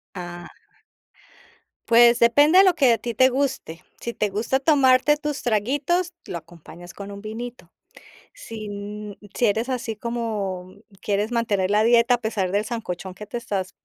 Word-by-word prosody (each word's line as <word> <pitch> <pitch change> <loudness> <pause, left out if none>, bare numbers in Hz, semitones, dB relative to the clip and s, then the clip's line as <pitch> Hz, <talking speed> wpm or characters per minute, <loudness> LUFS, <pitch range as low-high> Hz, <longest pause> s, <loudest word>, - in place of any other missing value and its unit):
Ah 175 -1 -8 1.4
pues 235 0 +6
depende 290 +9 +5
de - - +8
lo 370 -3 +4
que 265 -7 +4
a - - +1
ti 235 0 -5
te 255 +4 +5
guste. 260 -11 -3 0.2
Si 235 - -5
te 210 - -1
gusta 220 +7 -1
tomarte 275 0 +4
tus 295 -1 -4
traguitos, 285 - 0
lo 175 - -5
acompañas 170 +1 -13
con 200 0 -9
un 200 0 -9
vinito. 225 -3 -8 0.6
Sí 225 - -8
n 205 0 -7 0.2
sí 240 - +2
eres 225 +4 0
así 245 -3 -3
como, 215 -5 -3
mm, 185 +2 -17 0.2
quieres 205 +2 -1
mantener 205 -5 0
la 210 +1 +3
dieta, 235 +1 +4
a - - 0
pesar 210 -5 -2
del 205 +1 +1
sancochón 190 -5 -5
que 210 +3 -10
te 240 - -5
estás 195 -5 -4
225 Hz, 170 wpm, -23 LUFS, 200-250 Hz, 1.4 s, de